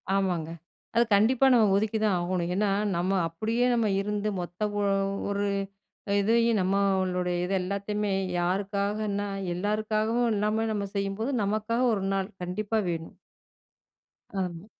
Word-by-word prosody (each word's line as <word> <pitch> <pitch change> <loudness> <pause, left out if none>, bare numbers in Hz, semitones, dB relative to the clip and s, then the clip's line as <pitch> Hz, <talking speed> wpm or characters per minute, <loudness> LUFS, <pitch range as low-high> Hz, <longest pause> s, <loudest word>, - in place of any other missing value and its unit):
ஆமாங்க. 180 -5 0 0.5
அது 235 - +6
கண்டிப்பா 235 +6 +4
நம்ம 225 -3 +5
ஒதுக்கி 220 +2 +1
தான் 200 - +3
ஆகணும். 175 0 -1
ஏன்னா 210 +1 +2 0.3
நம்ம 175 +2 0 0.2
அப்படியே 220 +9 -1
நம்ம 230 -2 +2
இருந்து 210 +1 -1
மொத்த 175 +4 -3
ஓ - - +1 0.5
ஒரு 200 0 0 0.8
இதையும் 230 +1 +3
நம்மளோட 190 -1 +1 0.2
இது 180 +2 -2
எல்லாத்தையுமே, 200 +2 -2 0.3
யாருக்காகன்னா, 200 +3 -1 0.3
எல்லாருக்காகவும் 215 +4 0
இல்லாம 215 +2 +1
நம்ம 205 -2 -1
செய்யும்போது 200 +5 -1
நமக்காக 215 +4 0
1 195 -3 -1
நாள் 195 +1 -1
கண்டிப்பா 205 +5 -2
வேணும்! 165 -1 -5 1.2
ஆமா. 180 0 -5
200 Hz, 120 wpm, -27 LUFS, 185-215 Hz, 1.2 s, அது